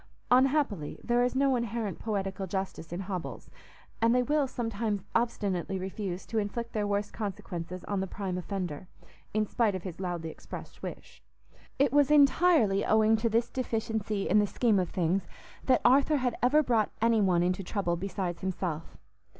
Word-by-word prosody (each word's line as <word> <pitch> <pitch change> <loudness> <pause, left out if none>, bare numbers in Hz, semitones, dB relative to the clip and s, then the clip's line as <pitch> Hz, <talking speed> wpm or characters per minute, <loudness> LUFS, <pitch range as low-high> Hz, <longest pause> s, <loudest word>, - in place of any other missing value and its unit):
Unhappily, 255 - +2
there 240 0 +2
is 250 +1 0
no 270 0 +3
inherent 230 -5 -2
poetical 195 -3 -3
justice 190 -3 -4
in 175 +2 -3
hobbles, 185 -3 -6 0.5
and 230 +1 +4
they 250 - +3
will 290 +1 +1
sometimes 225 -5 -2
obstinately 200 -5 0
refuse 190 -1 -4
to 225 - -1
inflict 230 +3 -4
their 210 -2 0
worst 205 0 -1
consequences 185 -4 -5
on 200 -1 -2
the 190 - -2
prime 190 -1 -4
offender, 180 -3 -4 0.4
in 215 0 +1
spite 215 -1 +1
of 185 - -5
his 180 -3 -7
loudly 175 -3 -3
expressed - - -10
wish. - - -8 0.6
It 275 -1 +3
was 290 -1 +5
entirely 285 - +5
owing 220 0 +4
to 230 +1 0
this 230 +2 +1
deficiency 220 -4 -2
in 210 - +4
the 205 - +2
scheme 220 -2 +2
of 180 -2 -1
things 180 +1 0 0.4
that 255 -2 +4
Arthur 280 +4 +5
had 250 -3 0
ever 295 +5 +4
brought 230 -5 +2
any 225 -1 +3
one 180 -3 +3
into 180 +2 0
trouble 175 -2 -1
besides 180 -1 -3
himself. 175 -4 -3
205 Hz, 165 wpm, -29 LUFS, 185-240 Hz, 0.6 s, was